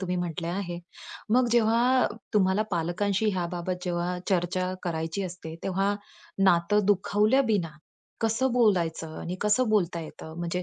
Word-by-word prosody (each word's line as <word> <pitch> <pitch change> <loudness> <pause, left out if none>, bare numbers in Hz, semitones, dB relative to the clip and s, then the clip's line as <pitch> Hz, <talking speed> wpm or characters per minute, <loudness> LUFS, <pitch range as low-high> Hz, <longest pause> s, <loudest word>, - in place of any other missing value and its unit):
तुम्ही 180 -1 -2
म्हटले 175 -1 -3
आहे. 175 -1 -3 0.6
मग 250 -1 +4
जेव्हा 240 +2 +4 0.3
तुम्हाला 190 +1 +3
पालकांशी 190 +5 0
ह्या 180 -3 -1
बाबत 180 +1 -3
जेव्हा 175 0 -1
चर्चा 185 0 0
करायची 165 +2 -2
असते, 170 -3 -7
तेव्हा 195 +2 0 0.5
नातं 190 +3 +3
दुखावल्या 210 +5 +3
बिना 175 -6 0 0.5
कसं 230 +3 +1
बोलायचं 170 -9 +1
आणि 180 +2 -4
कसं 215 +4 +2
बोलता 180 -5 +1
येतं? 160 0 -9
म्हणजे 175 +1 -2
185 Hz, 135 wpm, -27 LUFS, 175-210 Hz, 0.6 s, मग